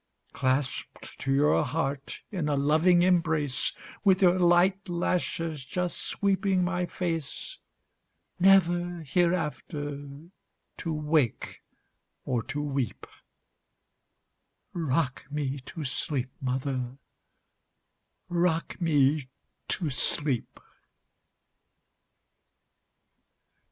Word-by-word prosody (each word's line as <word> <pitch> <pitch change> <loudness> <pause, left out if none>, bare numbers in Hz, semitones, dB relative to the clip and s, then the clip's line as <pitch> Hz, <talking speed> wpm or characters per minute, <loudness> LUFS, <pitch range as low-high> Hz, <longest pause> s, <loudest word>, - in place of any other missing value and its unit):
Clasped 130 +1 -2
to 135 - -2
your 145 +3 +4
heart 140 -1 -3
in 175 -7 -1
a 145 - +2
loving 160 +5 +4
embrace, 160 -7 +1 0.3
With 190 -2 +4
your 180 0 +5
light 180 +2 +3
lashes 165 -3 -1
just 180 +7 -2
sweeping 195 -2 +1
my 180 0 -1
face, 170 - -4 0.8
Never 175 -2 +4
hereafter 150 -3 -1 0.7
to 165 - -3
wake 150 -5 0 0.6
or 120 -2 0
to 145 +6 -4
weep;—Rock 140 - -6
me 145 -2 -2
to 165 - -6
sleep, 130 -1 -2
mother,—rock 135 +6 -5
me 145 -4 +2 0.4
to 165 -5 0
sleep! 135 -1 +1
155 Hz, 75 wpm, -28 LUFS, 140-175 Hz, 0.8 s, your